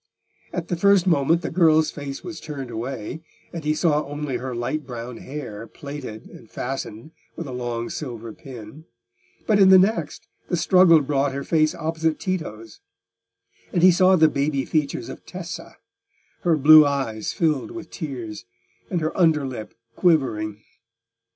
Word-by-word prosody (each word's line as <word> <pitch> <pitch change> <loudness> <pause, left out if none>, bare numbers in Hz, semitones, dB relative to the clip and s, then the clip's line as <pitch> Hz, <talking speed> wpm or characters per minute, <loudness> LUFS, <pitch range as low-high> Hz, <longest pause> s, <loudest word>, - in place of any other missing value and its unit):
At 175 -2 -4
the 175 - 0
first 200 +1 +4
moment 165 0 +2
the - - -3
girl's 160 -2 +4
face 140 0 -7
was 170 -3 -7
turned 140 -5 -6
away, 120 +5 -5 0.3
and 165 -2 -5
he 150 +1 +1
saw 155 -2 +2
only 145 -2 -4
her 130 -1 -5
light 120 +6 -2
brown 120 -2 -7
hair 125 -6 -7
plaited 140 -7 -8
and 115 - -15
fastened 130 +1 -5 0.2
with 170 - -6
a 135 - -7
long 120 -2 -3
silver 115 -6 -6
pin; 130 +4 -11 0.6
but 210 -2 +3
in 190 -1 +7
the 190 - +9
next, 185 - 0 0.2
the 175 - +1
struggle 170 -1 +6
brought 140 -1 0
her 140 +1 -4
face 155 -1 +2
opposite 160 -1 -1
Tito's, 115 - -5 0.9
and 175 - +1
he 185 - +9
saw 185 +1 +5
the 160 -3 +6
baby 140 -2 -1
features 150 -3 -1
of - - -9
Tessa, - - -8 0.6
her 165 -2 +2
blue 155 +2 +9
eyes 135 -7 -2
filled 155 -6 0
with 170 -2 -9
tears, 115 - -6 0.4
and 175 -3 -1
her 155 +1 -2
under 160 -5 +3
lip 125 -5 -7 0.2
quivering. 110 - +1
150 Hz, 155 wpm, -23 LUFS, 125-165 Hz, 0.9 s, the